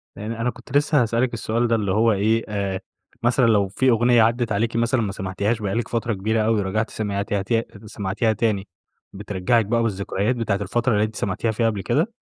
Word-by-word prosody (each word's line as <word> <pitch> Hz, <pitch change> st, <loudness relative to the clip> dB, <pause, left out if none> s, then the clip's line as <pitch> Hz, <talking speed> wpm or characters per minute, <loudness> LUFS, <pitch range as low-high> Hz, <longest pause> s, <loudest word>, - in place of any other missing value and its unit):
يعني 115 Hz, +2 st, -5 dB
أنا 125 Hz, -, +1 dB
كنت 120 Hz, +3 st, -2 dB
لسه 145 Hz, -1 st, +3 dB
هاسألك 120 Hz, +2 st, 0 dB
السؤال 115 Hz, +1 st, 0 dB
ده 115 Hz, -, +2 dB
اللي 105 Hz, -4 st, -1 dB
هو 110 Hz, +3 st, +3 dB
إيه، 110 Hz, +3 st, +1 dB
آآ 100 Hz, -2 st, -2 dB, 0.4 s
مثلًا 120 Hz, +1 st, +3 dB
لو 105 Hz, -4 st, +3 dB
في 130 Hz, +7 st, +1 dB
أغنية 120 Hz, 0 st, +4 dB
عدَّت 115 Hz, +1 st, +1 dB
عليكِ 115 Hz, +3 st, 0 dB
مثلًا 115 Hz, +1 st, +1 dB
ما 105 Hz, -3 st, -2 dB
سمعتيهاش 100 Hz, +4 st, -2 dB
بقى 100 Hz, -2 st, -2 dB
لِك 115 Hz, 0 st, -1 dB
فترة 115 Hz, 0 st, -1 dB
كبيرة 110 Hz, +3 st, 0 dB
أوي 110 Hz, 0 st, +2 dB
ورجعتِ 105 Hz, +3 st, -1 dB
سمعتيها 100 Hz, -1 st, -2 dB
ت 115 Hz, +3 st, 0 dB, 0.2 s
سمعتيها 105 Hz, +2 st, -1 dB
تاني، 105 Hz, -2 st, -1 dB, 0.5 s
بترجَّعِك 105 Hz, +3 st, 0 dB
بقى 115 Hz, +2 st, +1 dB
بالذكريات 100 Hz, +2 st, -1 dB
بتاعة 115 Hz, -4 st, 0 dB
الفترة 120 Hz, +5 st, 0 dB
اللي 105 Hz, 0 st, +2 dB
أنتِ 110 Hz, 0 st, -3 dB
سمعتيها 100 Hz, +4 st, -1 dB
فيها 115 Hz, +1 st, 0 dB
قبل 105 Hz, -3 st, -3 dB
كده؟ 165 Hz, -, 0 dB
110 Hz, 200 wpm, -22 LUFS, 100-115 Hz, 0.5 s, أغنية